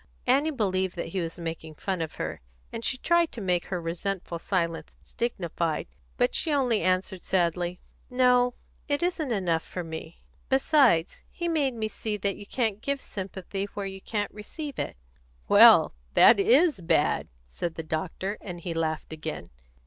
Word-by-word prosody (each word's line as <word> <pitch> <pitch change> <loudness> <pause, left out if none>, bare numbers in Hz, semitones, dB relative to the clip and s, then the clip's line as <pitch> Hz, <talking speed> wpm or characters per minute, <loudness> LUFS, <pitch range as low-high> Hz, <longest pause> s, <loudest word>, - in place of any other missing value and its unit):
_ - - -30 0.2
Annie 275 +5 +3
believed 190 - 0
that 170 -1 -4
he 190 - -2
was 165 -1 -4
making 165 -2 -6
fun 185 +2 -2
of 160 - -4
her, - - -4 0.3
and 230 - -5
she 255 - 0
tried 340 +4 +2
to 240 - -6
make 180 -4 0
her 180 - -3
resentful 170 +1 -3
silence 170 -2 -2 0.2
dignified; 170 -8 -1 0.3
but 125 - +2
she 320 - 0
only 255 -6 +2
answered 185 0 0
sadly: 175 -1 0 0.3
"No; 250 -1 +3 0.3
it 285 +2 0
isn't 330 -6 -1
enough 180 -6 +1
for 180 - -6
me. 160 0 -8 0.3
Besides, 265 - +3
he 345 - -4
made 290 -6 +1
me 220 -1 -1
see 215 -1 -4
that 200 -1 -1
you 205 - -11
can't 220 -4 -1
give 280 +1 -1
sympathy 195 -2 -5
where 200 - -3
you 195 0 -6
can't 205 0 -3
receive 280 +8 -6
it." - - -3 0.5
"Well, - - +8 0.2
that 225 - +8
is 275 - +4
bad," 165 -3 +2 0.2
said 160 - -4
the 165 - -5
doctor, 175 +6 -3
and 180 -3 -7
he 170 0 -3
laughed 160 -1 -2
again. 155 - -6
195 Hz, 170 wpm, -27 LUFS, 170-245 Hz, 0.5 s, Well